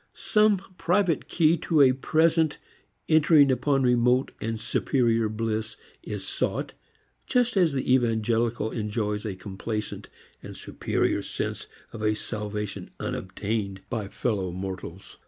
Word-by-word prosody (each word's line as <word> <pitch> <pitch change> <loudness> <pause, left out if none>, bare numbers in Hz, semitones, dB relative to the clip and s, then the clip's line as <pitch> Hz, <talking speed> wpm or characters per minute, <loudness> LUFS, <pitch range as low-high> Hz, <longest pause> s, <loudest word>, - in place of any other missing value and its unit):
Some 210 -1 +3 0.2
private 180 -3 +1
key 165 0 +3
to 155 -1 +2
a 130 -2 +7
present 160 +3 +2 0.5
entering 155 -3 +5
upon 135 +1 +1
remote 125 +1 +3
and 115 0 -3
superior 115 -2 +1
bliss 110 0 -3 0.2
is - - -6
sought, - - -2 0.5
just 245 -2 +2
as 180 -5 +4
the 130 -1 +1
evangelical 115 -2 +1
enjoys 105 -1 -2
a 100 - -4
complacent 105 +3 -5 0.3
and - - -9
superior - - -1
sense - - -4 0.3
of 115 - -7
a 110 0 +2
salvation 105 -1 -5
unobtained 100 0 -3
by 110 -5 -2
fellow 100 -3 -2
mortals. 95 0 -7
115 Hz, 120 wpm, -26 LUFS, 105-145 Hz, 0.5 s, a